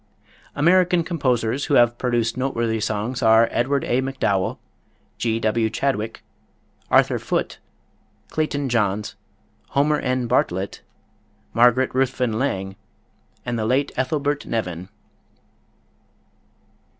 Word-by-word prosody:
American 175 +3 +3
composers 130 -6 0
who 145 - +1
have 120 -1 +4
produced 120 -2 0
noteworthy 115 -3 -1
songs 110 +4 -2
are 110 0 +5
Edward 135 +3 0
A. 125 +2 +1
MacDowell, 105 -8 -1 0.6
G. 115 -1 0
W. 110 0 +1
Chadwick, 115 -4 -2 0.7
Arthur - - +3
Foote, - - -2 0.7
Clayton 145 -3 -1
Johns, 105 -4 0 0.6
Homer 150 +2 +2
N. 125 -1 -1
Bartlett, 95 -4 -1 0.7
Margaret 125 +2 +4
Ruthven 125 -3 0
Lang, 95 -8 -2 0.7
and 120 -2 -2
the 110 - -1
late 135 +4 +1
Ethelbert 145 +2 -1
Nevin. 90 -5 -3
120 Hz, 100 wpm, -22 LUFS, 110-135 Hz, 0.7 s, are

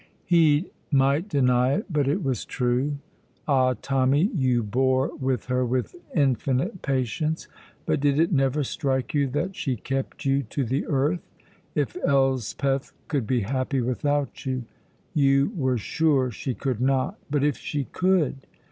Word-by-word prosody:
He 165 -1 +3 0.2
might 140 +6 +2
deny 125 -3 +3
it, 205 - -1
but 150 -7 0
it 170 +7 0
was 130 -3 -1
true. 130 +3 0 0.5
Ah, 130 -3 +3
Tommy, 135 - +2
you 130 - +2
bore 130 +5 +1
with 130 -5 -1
her 125 0 0
with 125 - -1 0.2
infinite 140 - +1
patience, 140 +4 -1 0.4
but 155 -2 +1
did 140 +1 +2
it 165 +3 +3
never 135 -1 +2
strike 130 -1 -2
you 145 -2 +2
that 170 +9 -2
she 130 -3 -1
kept 135 +5 -4
you 135 0 +2
to 135 +3 -3
the 130 +6 -1
earth? 150 +4 0 0.5
If - - 0
Elspeth 135 0 +1 0.2
could 135 -8 -1
be 125 -2 +1
happy 130 +5 -1
without 140 +3 -1
you! 130 -2 -2 0.5
You 140 -1 +3
were 130 -6 +1
sure 135 +2 +1
she 125 +3 -4
could 130 -4 -2
not, 130 +1 +1
but 145 -1 +1
if 145 -5 +1
she 145 -2 -3
could! 165 -4 0
135 Hz, 150 wpm, -25 LUFS, 130-145 Hz, 0.5 s, He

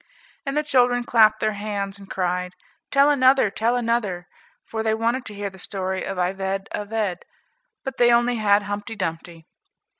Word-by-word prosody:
And 275 +2 -1
the 300 - +2
children 245 -4 +3
clapped 220 -2 +4
their 215 - +2
hands 200 -1 -4
and 195 - -13
cried, 180 0 -2 0.3
"Tell 280 +1 +5
another, 260 -5 +4
tell 230 +4 +1
another," 225 -7 -1 0.4
for 220 - -4
they 220 0 +1
wanted 235 +3 -1
to 210 - -7
hear 200 -1 -4
the 190 - -14
story 190 0 -3
of 195 - -4
"Ivede 190 +2 -2
Avede;" 205 -3 -2 0.6
but 270 - -5
they 240 0 +5
only 240 0 +3
had 205 -1 +3
"Humpty 205 +2 -5
Dumpty." 165 -3 -5
210 Hz, 170 wpm, -23 LUFS, 195-240 Hz, 0.6 s, Tell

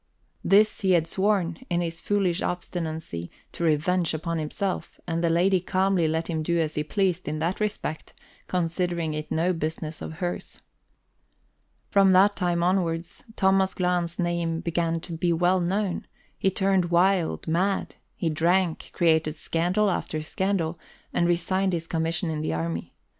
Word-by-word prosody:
This 210 +3 +4
he 190 -2 +3
had 165 -2 +3
sworn, 190 -2 0
in 175 -1 +1
his 165 -1 -4
foolish 195 -4 +1
obstinacy, 160 - -4 0.2
to - - -5
revenge 165 +2 +2
upon 165 +1 -2
himself, 180 +5 -3
and 170 0 -2
the 170 - +3
lady 180 +3 +3
calmly 185 -1 +1
let 160 +1 -1
him 160 -2 -1
do 170 +2 0
as 155 -1 0
he 150 - -1
pleased 185 +1 0
in 150 +1 -2
that 165 +4 -1
respect, 210 -7 -3 0.3
considering 170 -2 -1
it 150 0 -5
no 175 +3 +2
business 155 -1 -4
of - - -5
hers. 175 +2 -5 1.3
From 195 -2 +5
that 200 +2 +5
time 175 -2 0
onwards, 175 -2 -1
Thomas 190 -1 +3
Glahn's 180 -2 0
name 170 -2 -1
began 165 0 0
to 170 - -7
be 170 +1 0
well 175 +3 +3
known; 185 +1 -1 0.3
he 195 - +1
turned 190 -1 +2
wild, 175 -1 +2
mad; 185 +5 0 0.2
he 165 - -1
drank, 170 +2 +1
created 160 -3 +2
scandal 175 +6 +1
after 155 -3 -2
scandal, 175 -1 -1 0.3
and 170 - +2
resigned 185 +2 +1
his 165 -1 -2
commission 165 +1 -1
in 155 -1 -2
the 155 - -1
army. 80 0 -4
175 Hz, 155 wpm, -26 LUFS, 160-185 Hz, 1.3 s, From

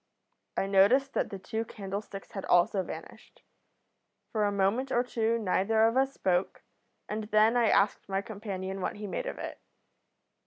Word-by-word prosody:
I - - +1
noticed 205 +8 +4
that - - 0
the 195 - -6
two 220 +4 -3
candlesticks 200 -2 -7
had 195 - -5
also 180 +2 +3
vanished. - - -10 0.9
For 215 -2 0
a 205 - +1
moment 200 +7 +1
or 240 - +3
two 230 -2 0
neither 220 +1 +2
of 230 - 0
us 270 +1 +3
spoke, 185 -7 -1 0.4
and 215 0 -3
then 215 +2 +4
I 235 -3 +4
asked 200 0 +2
my 195 0 -1
companion 195 -3 -5
what - - -2
he 210 0 -7
made - - -3
of - - -4
it. - - -7
210 Hz, 165 wpm, -29 LUFS, 195-230 Hz, 0.9 s, noticed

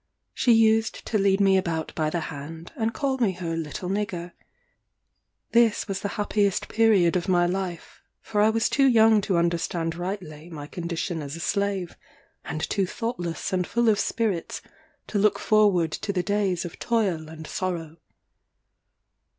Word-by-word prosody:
She 245 - +2
used 225 0 +3
to 215 - 0
lead 195 0 +3
me 195 -1 +5
about 165 -4 -2
by 155 -1 0
the 170 +2 -2
hand, 160 +3 -8
and 225 0 0
call 270 0 -1
me 215 -6 +2
her 170 -2 -4
little 165 +2 -4
nigger. 185 -3 -3 1.2
This 230 -3 +3
was 195 -1 -2
the - - -3
happiest 205 -2 +1
period 210 -7 +3
of 180 - -1
my 175 -1 +4
life; 180 -1 -4 0.2
for 210 -1 -1
I 215 - +5
was 225 0 +2
too 275 -1 +3
young 225 -3 +5
to 190 -3 0
understand 170 -1 0
rightly 175 -3 -6
my 150 -4 -7
condition 170 +1 -4
as 140 +1 -6
a - - -8
slave, 200 -1 -1 0.5
and 155 - -3
too 195 -3 0
thoughtless 190 -7 -4
and 180 -1 0
full 235 -1 +2
of 210 -1 +3
spirits 215 -9 -1 0.4
to 205 - -2
look 210 0 +3
forward 200 -7 +3
to 200 - -3
the 180 -2 -1
days 195 -2 0
of 175 - -8
toil 190 -10 0
and 160 0 -9
sorrow. 165 -3 -4
185 Hz, 165 wpm, -25 LUFS, 170-215 Hz, 1.2 s, me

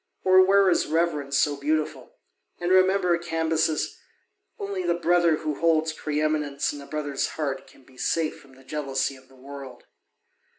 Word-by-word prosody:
Or 185 0 +6
where 195 +1 +4
is 180 - +2
reverence 150 -4 0
so 145 0 +2
beautiful? 150 +2 -2 0.4
And 175 +1 -1
remember, 185 -1 +4
Cambyses, 160 -2 -1 0.6
only 200 -1 -4
the 175 -1 +1
brother 175 -1 +3
who 150 -1 -4
holds 160 -1 +2
pre 150 -1 -3
eminence 150 -2 0
in 145 - -8
a 140 - -12
brother's 145 -3 -2
heart 145 -4 -3
can - - -20
be 130 0 -21
safe 160 +4 -1
from 135 -1 -19
the 135 - -18
jealousy 135 -1 -2
of 130 0 -18
the 135 - -20
world. 135 -1 -10
155 Hz, 165 wpm, -25 LUFS, 140-170 Hz, 0.6 s, Or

